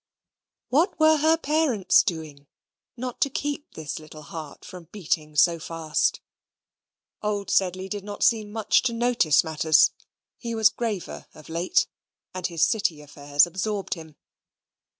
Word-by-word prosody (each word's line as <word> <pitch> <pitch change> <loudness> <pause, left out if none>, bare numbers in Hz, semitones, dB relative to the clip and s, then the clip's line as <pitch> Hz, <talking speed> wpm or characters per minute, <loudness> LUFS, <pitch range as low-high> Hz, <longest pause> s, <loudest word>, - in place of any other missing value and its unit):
What 330 +8 +2
were 315 0 +5
her 315 +2 +3
parents 290 - +3
doing, 155 -6 -5 0.5
not 250 0 -6
to 280 - +3
keep 290 +2 -4
this 160 -1 -5
little 155 0 -12
heart 155 -1 -9
from 180 -2 -10
beating 160 -4 -3
so 165 +3 +4
fast? 160 -1 -1 1.0
Old 205 -1 -2
Sedley 185 0 +1
did 205 0 -5
not 205 0 -5
seem 215 -3 +2
much 220 -1 +2
to - - -6
notice 230 -10 +3
matters. 160 -1 +3 0.5
He 235 -1 -4
was 220 -1 +5
graver 215 -6 -4
of 155 0 -14
late, 170 +2 +1 0.5
and 185 -1 -2
his 170 -2 +2
City 185 -8 0
affairs 145 -1 +1
absorbed 195 +3 -3
him. 160 -3 -11
185 Hz, 140 wpm, -25 LUFS, 160-230 Hz, 1.0 s, were